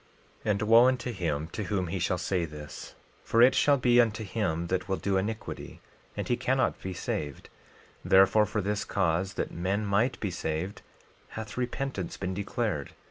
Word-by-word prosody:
12:22 - - 0
And 100 0 -1
wo 115 +3 +7
unto 125 -1 0
him 80 -7 -2
to 105 - -3
whom 95 -1 -1
he 90 +2 -3
shall 90 +2 0
say 90 0 -1
this, 75 -2 -8 0.3
for 115 - +1
it 130 +1 +7
shall 140 +2 +4
be 120 -1 +5
unto 110 -1 -1
him 95 -5 -1
that 95 +2 -2
will 95 - +1
do 95 +3 -1
iniquity, 105 +4 -4 0.4
and - - -3
he 120 - +2
cannot 130 +2 0
be 95 - -4
saved; 75 -5 -4 0.5
therefore, 95 +3 +5
for 105 +1 -1
this 105 +2 -1
cause, 95 0 0
that - - -2
men 95 +5 -1
might 110 +6 +1
be 100 - -2
saved, 85 +3 -3 0.6
hath 110 -2 -6
repentance 125 -5 -3
been 95 -1 -3
declared. 100 -5 -2
100 Hz, 180 wpm, -29 LUFS, 90-115 Hz, 0.6 s, wo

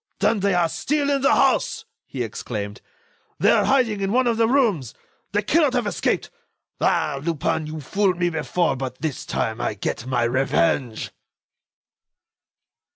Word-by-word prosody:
"Then 225 - +2
they 195 -1 +1
are 175 -1 +3
still 285 - -1
in 275 -1 +1
the 275 - +4
house!" - - +2 0.2
he 130 -3 -3
exclaimed. 105 -2 -5 0.6
"They - - +4
are - - +3
hiding 235 -7 +2
in 195 0 0
one 255 +3 +3
of 235 -2 +1
the 225 0 +3
rooms! 220 - +1 0.4
They - - 0
cannot - - +3
have - - 0
escaped. - - -1 0.5
Ah! 140 - +1
Lupin, 160 0 -1
you 155 0 -6
fooled 190 +5 0
me 175 -1 +1
before, 170 +1 0
but, 130 -1 -5
this 155 -5 -3
time, 110 +1 -2
I 110 - -1
get 115 +4 -4
my 125 -2 +1
revenge." 130 0 0
165 Hz, 155 wpm, -23 LUFS, 130-210 Hz, 0.6 s, the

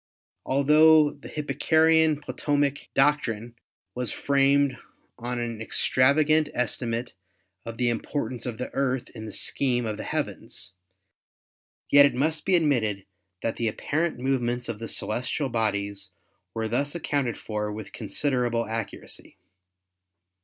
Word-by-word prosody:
Altho 150 +2 +6
the 140 - -12
Hip 150 -1 -5
parchian 160 +2 +3
Ptolemaic 145 -1 -1
doctrine 120 -5 +1 0.4
was 125 -3 -3
framed 140 -1 +2 0.4
on 120 +1 -3
an 115 -2 -4
extravagant 145 +7 +3
"estimate 120 0 -2 0.5
of 115 0 -6
the 125 - +1
importance 120 0 -3
of 115 -3 -4
the 125 - -5
Earth 130 -2 -1
in 110 -1 -8
the - - -6
scheme 120 +2 0
of 110 -1 -3
the - - -5
heavens, 90 - -4 1.2
yet 145 0 +8
it - - -4
must 155 +3 0
be 190 - +5
admitted 115 - +1 0.4
that 115 - -1
the 115 - 0
apparent 155 +9 -1
movements 125 -2 -1
of 115 -3 -4
the 115 - -5
celestial 125 +7 -2
bodies 100 -4 -1 0.5
were 110 0 -1
thus 140 +7 -1
accounted 145 -7 -1
for 105 -1 -3
with 105 -1 -8
considerable 125 -5 -1
accuracy. 110 -2 -6
125 Hz, 130 wpm, -26 LUFS, 115-145 Hz, 1.2 s, yet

